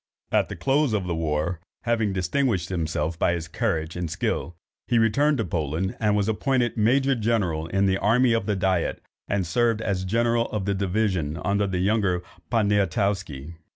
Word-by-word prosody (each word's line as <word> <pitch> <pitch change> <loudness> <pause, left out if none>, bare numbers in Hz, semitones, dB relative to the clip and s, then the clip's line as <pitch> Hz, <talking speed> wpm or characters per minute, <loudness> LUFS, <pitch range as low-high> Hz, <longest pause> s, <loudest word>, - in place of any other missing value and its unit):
At - - +2
the - - -5
close 140 -2 +1
of 100 -3 0
the 90 - -2
war, 80 +1 -1 0.2
having 115 -3 +1
distinguished 95 - 0
himself 80 -2 -2
by 85 - +2
his 85 -2 -4
courage 80 0 -2
and 90 -2 -3
skill, 85 +2 -2 0.3
he 120 - +2
returned 140 +7 +3
to 110 - -1
Poland, 80 +2 -2
was 105 -1 +2
appointed 120 +2 0
major 135 +5 +3
general 105 -9 0
in 95 +3 +1
the 95 0 +2
army 120 +3 +3
of 115 - 0
the 105 - +1
diet, 95 -3 0 0.3
and 100 -2 0
served 115 +5 +1
as 100 -4 -1
general 115 +4 +1
of 105 -3 -3
division 95 -5 0
under 100 0 +1
the 95 -2 -2
younger 95 -2 +1 0.3
Poniatowski. 100 - 0
100 Hz, 165 wpm, -25 LUFS, 85-115 Hz, 0.3 s, returned